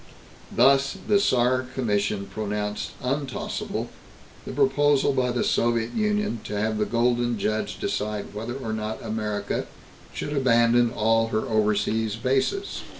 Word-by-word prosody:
Thus 135 +6 +4
the 205 -1 +4
Saar 130 -6 +2
Commission 105 -4 0
pronounced 105 0 -3
untossable 135 +1 -3 0.6
the - - -4
proposal 145 +1 +3
by 130 -2 +1
the 120 0 0
Soviet 115 -1 +1
Union 210 - 0
to 105 0 -3
have 110 0 0
the 105 - +2
Golden 120 0 +1
Judge 110 +2 -2
decide 105 -1 -3
whether 115 +4 -5
or 115 -5 -4
not 110 0 -4
America 105 -2 -2 0.4
should 145 - -4
abandon 120 -2 +4
all 115 0 +2
her 110 -1 0
overseas 110 0 +1
bases. 135 - -1
115 Hz, 130 wpm, -25 LUFS, 110-130 Hz, 0.6 s, Thus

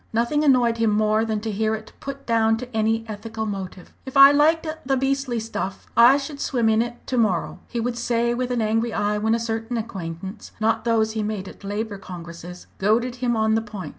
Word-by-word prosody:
Nothing 235 +7 +1
annoyed 245 -5 +4
him 225 -1 +2
more 215 +1 +2
than 220 -2 -2
to 220 0 -3
hear 220 +2 0
it 215 0 -10
put 275 0 -7
down 225 -1 +2
to 245 0 -8
any 225 +1 +1
ethical 220 +1 -5
motive. 190 -3 -6
"If 265 0 -5
I 275 +1 +10
liked 310 +3 +3 0.2
the 270 0 +1
beastly 270 -2 0
stuff, 215 -3 -5
I 240 +4 +7
should 285 0 -6
swim 240 -6 +1
in 220 0 +3
it 240 +1 -5
to 255 - -1
morrow," 200 -7 0
he 240 - -4
would 240 +1 -2
say 235 0 +1
with 250 +1 -2
an 245 -2 0
angry 225 +2 0
eye 210 -1 0
when 220 +2 +2
certain 225 +1 -3
acquaintance 190 -2 -6
not 225 +1 +1
those 225 -2 +2
he 220 0 -2
made 210 -2 -3
at - - -12
Labour 205 +1 -4
Congresses 175 -1 -9
goaded 235 +5 +1
him 245 -1 0
on 220 0 +2
the 225 - +2
point. 205 -7 -7
225 Hz, 210 wpm, -23 LUFS, 215-240 Hz, 0.2 s, I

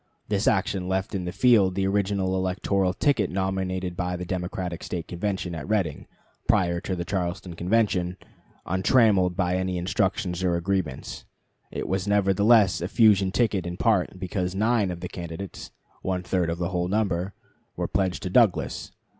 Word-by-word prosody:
This 100 -1 0
action 95 -2 +1
left 95 0 -1
in 95 -3 -2
the 90 - -3
field 100 -4 +4
the 95 - 0
original 95 -1 0
electoral 95 0 0
ticket 105 -1 +1
nominated 95 -1 -2
by 90 0 -2
the 90 0 -5
Democratic 90 -1 -4
State 85 -3 -5
Convention 95 0 -3
at 80 +3 -6
Reading, 95 -9 -1 0.4
prior 85 -1 +2
to 95 - -3
the 85 -1 -4
Charleston 90 -1 -3
Convention, 90 -1 +1 0.5
untrammeled 95 -1 +3
by 90 -1 +1
any 95 -1 -1
instructions 90 0 -1
or 90 -2 +2
agreements. 85 -6 -3 0.4
It - - -4
was 95 +2 -1
nevertheless 100 -1 +4
a 90 - -1
fusion 100 -2 +4
ticket 100 -6 +1
in 90 0 -5
part, 100 -5 +1
because 90 0 -2
nine 110 -1 +2
of 85 -1 -5
the - - -4
candidates 85 +2 -7 0.3
(one 90 -1 -2
third 90 -2 0
of 85 - -2
the 85 0 -2
whole 90 -1 -1
number) 95 -2 -1 0.4
were - - -2
pledged 95 -1 -1
to 90 - -3
Douglas. 110 -3 +2
95 Hz, 165 wpm, -25 LUFS, 90-100 Hz, 0.5 s, field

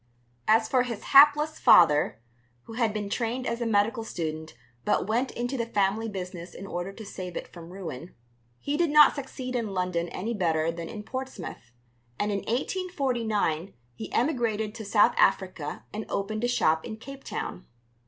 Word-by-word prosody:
As 220 0 +4
for 255 +1 +3
his 235 -3 -4
hapless 295 +2 +7
father 150 -9 +5 0.4
(who 225 - -11
had 230 -2 +1
been 210 -1 -3
trained 240 +4 -2
as 235 -1 -2
a 235 - 0
medical 225 +2 +2
student 160 - -5 0.3
but - - +1
went 235 +6 0
into 245 +3 -3
the 235 - -1
family 210 +1 0
business 180 -3 -7
in 195 - -8
order 175 0 -4
to 220 +2 -10
save 180 -3 -6
it - - -5
from 170 -1 -12
ruin), 175 -4 -7 0.4
he 285 +1 -2
did 340 -1 +2
not 300 0 +7
succeed 260 -2 -6
in 220 -5 -2
London 180 -2 -1
any 220 +8 -3
better 165 -5 +1
than 165 0 -7
in 215 -2 -7
Portsmouth, 220 - -7 0.5
and 205 0 0
in 200 - 0
1849 235 - -1 0.2
he 110 -2 -8
emigrated 230 -6 0
to 225 -1 -7
South 205 +1 +4
Africa 185 -6 +1
and 215 +1 -5
opened 215 +3 -2
a - - +3
shop 160 -9 +2
in 220 - -6
Cape 275 +4 -10
Town. 180 - -5
215 Hz, 175 wpm, -27 LUFS, 180-245 Hz, 0.5 s, hapless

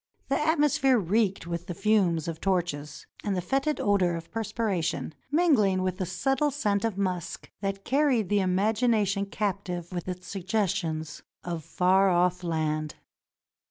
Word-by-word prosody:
The 275 - +2
atmosphere 295 -4 +3
reeked 200 -1 +1
with 170 0 -5
the 175 - -4
fumes 195 -5 +2
of 165 -1 -5
torches 170 -6 -2 0.2
and 200 -2 -1
the - - +1
fetid 275 - 0
odor 190 -4 +2
of 165 0 -8
perspiration, 215 -8 -2 0.2
mingling 255 - +3
with 185 +1 -2
the 185 - -1
subtle 270 - +1
scent 210 -8 0
of 225 -4 -1
musk 185 -4 -3
that 195 0 -3
carried 265 -6 +2
the 205 +1 +2
imagination 200 +1 +1
captive 190 -4 -3
with 175 -1 -4
its 180 0 -5
suggestions 180 -5 -2 0.2
of 170 -3 -4
far 190 +5 +3
ofif 180 0 +2
land. 155 -2 -1
195 Hz, 145 wpm, -27 LUFS, 175-220 Hz, 0.2 s, atmosphere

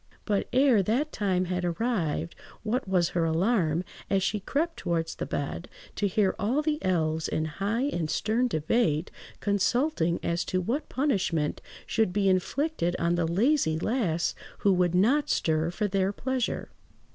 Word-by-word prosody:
But, 205 -2 0
ere 255 -4 +5
that 245 +10 0
time 185 -3 0
had 180 0 -2
arrived, 175 -4 -1 0.3
what 235 +2 -1
was 180 -3 +2
her 170 - 0
alarm, 165 0 +1 0.3
as 195 -1 +2
she 210 - 0
crept 320 - -1
towards 165 -1 -1
the - - -5
bed, 145 +4 -4 0.3
to 205 - +1
hear 195 0 +2
all 250 +9 +1
the 300 -1 -1
elves 160 -4 0
in 155 - -1
high 200 +9 -1
and 175 - -1
stern 225 +8 +1
debate 160 -2 0 0.3
consulting 205 - +1
as 170 +1 0
to 185 - 0
what 240 - -2
punishment 190 - 0 0.2
should 220 -5 +1
be 200 0 +2
inflicted 185 - 0
on 170 +1 +1
the 175 -1 +1
lazy 200 - +2
lass 175 -4 0 0.3
who 200 - +4
would 180 -1 +2
not 250 +11 +3
stir 160 0 +1
for 210 +4 -1
their 195 0 +1
pleasure. 255 +3 -2
190 Hz, 160 wpm, -28 LUFS, 170-235 Hz, 0.3 s, ere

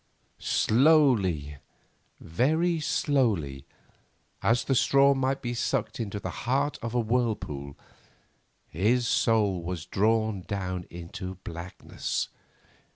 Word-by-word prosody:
Slowly, 110 - +3 0.6
very 160 - +1
slowly, 110 - 0 0.7
as 115 +2 +2
the 135 - 0
straw 140 +2 +5
might 135 0 -1
be 120 0 -2
sucked 120 +1 -2
into 105 -3 -3
the - - -5 0.2
heart 140 +3 +1
of 115 +1 -4
a - - +3
whirlpool, 110 - -2 0.9
his 115 +9 +1
soul 105 -7 +2
was 85 -1 -5
drawn 110 -1 +1
down 90 -2 -4
into 90 +2 -7
blackness. 85 +2 -4
110 Hz, 100 wpm, -27 LUFS, 90-130 Hz, 0.9 s, straw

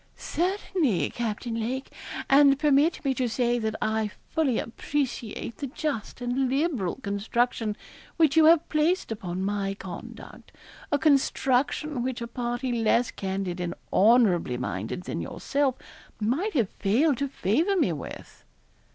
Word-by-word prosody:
'Certainly, 350 - 0
Captain 235 0 -3
Lake, 240 +4 -3 0.4
and 275 0 +6
permit 295 +2 +2
me 270 - +2
to 250 -1 -1
say 240 +1 +1
that 220 -1 -2
I 220 -1 0 0.2
fully 275 -8 +1
appreciate 240 -2 -3
the 280 - -4
just 265 -4 -4
and 250 +2 0
liberal 270 - 0
construction 220 0 -1 0.4
which 315 -3 +4
you 320 -1 +7
have 330 0 +6
placed 315 0 +1
upon 185 -4 -4
my 200 -1 -1
conduct 190 -2 -10 0.4
a 290 - +4
construction 275 -1 +1
which 255 0 -2
a 235 - -4
party 240 +1 -3
less 230 +1 +2
candid 190 -2 -3
and 175 -1 -3 0.2
honourably 195 - +4
minded 105 - -4
than - - -4
yourself 275 -2 -1 0.4
might 275 - 0
have 230 -8 +1
failed 255 +7 +2
to 280 - 0
favour 280 - +1
me 200 - +2
with.' 145 - -9
245 Hz, 135 wpm, -27 LUFS, 210-285 Hz, 0.4 s, you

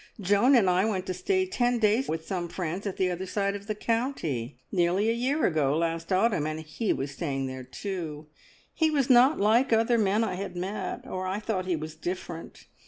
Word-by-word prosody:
Joan 205 +7 +4
and 220 -6 +5
I 180 +1 +3
went 195 -4 -1
to 185 - -2
stay 375 - +1
ten 245 -10 +1
days 225 +3 +2
with 160 0 -3
some 175 -3 -3
friends 180 +3 -4
at 195 - -4
the 185 -1 +1
other 180 +2 -4
side 200 +1 -1
of 200 0 -8
the 215 - -2
county, 210 - -2
nearly 185 +4 +2
a - - +1
year 260 +6 0
ago 150 -3 +2
last 165 +1 -2
autumn, 185 -5 +2
and 155 0 -3
he 160 +8 -2
was 135 +1 -2
staying 135 -2 -3
there 130 0 -5
too. 155 +1 -5 0.5
He 320 -1 +2
was 280 -4 +2
not 255 +5 +6
like 230 +6 +3
other 225 +1 +3
men 210 +1 +2
I 210 -5 -1
had 185 0 -5
met, 190 +4 -4
or 185 0 -4
I 190 +2 -2
thought 205 -4 -2
he 180 - +1
was 155 0 -6
different. 175 0 -6
190 Hz, 210 wpm, -27 LUFS, 165-225 Hz, 0.5 s, not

